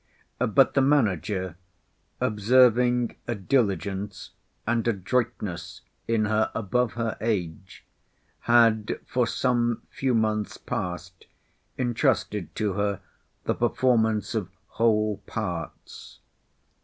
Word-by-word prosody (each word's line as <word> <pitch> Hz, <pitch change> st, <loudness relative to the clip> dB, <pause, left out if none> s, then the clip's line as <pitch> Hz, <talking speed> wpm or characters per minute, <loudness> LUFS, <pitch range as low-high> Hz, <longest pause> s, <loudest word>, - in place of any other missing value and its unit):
But 135 Hz, +4 st, +4 dB
the 135 Hz, -, +3 dB
manager, 100 Hz, -, +1 dB, 0.6 s
observing 120 Hz, +2 st, +3 dB
a 120 Hz, -, -1 dB
diligence 100 Hz, -, -1 dB, 0.3 s
and 115 Hz, 0 st, 0 dB
adroitness 95 Hz, -5 st, -2 dB, 0.3 s
in 115 Hz, -2 st, +2 dB
her 110 Hz, +1 st, +1 dB
above 115 Hz, +2 st, 0 dB
her 115 Hz, -1 st, -2 dB
age, 95 Hz, -5 st, -3 dB, 0.6 s
had 115 Hz, -3 st, +4 dB
for 125 Hz, -2 st, 0 dB
some 120 Hz, -2 st, 0 dB
few 130 Hz, -2 st, 0 dB
months 110 Hz, -1 st, 0 dB
past 90 Hz, +1 st, -5 dB, 0.5 s
intrusted 115 Hz, -, 0 dB
to 105 Hz, -3 st, -1 dB
her 100 Hz, 0 st, -1 dB, 0.4 s
the -, -, 0 dB
performance 110 Hz, -4 st, +1 dB
of 105 Hz, -6 st, -2 dB, 0.2 s
whole 110 Hz, -2 st, +1 dB
parts. 85 Hz, -2 st, -6 dB
110 Hz, 95 wpm, -26 LUFS, 95-120 Hz, 0.6 s, But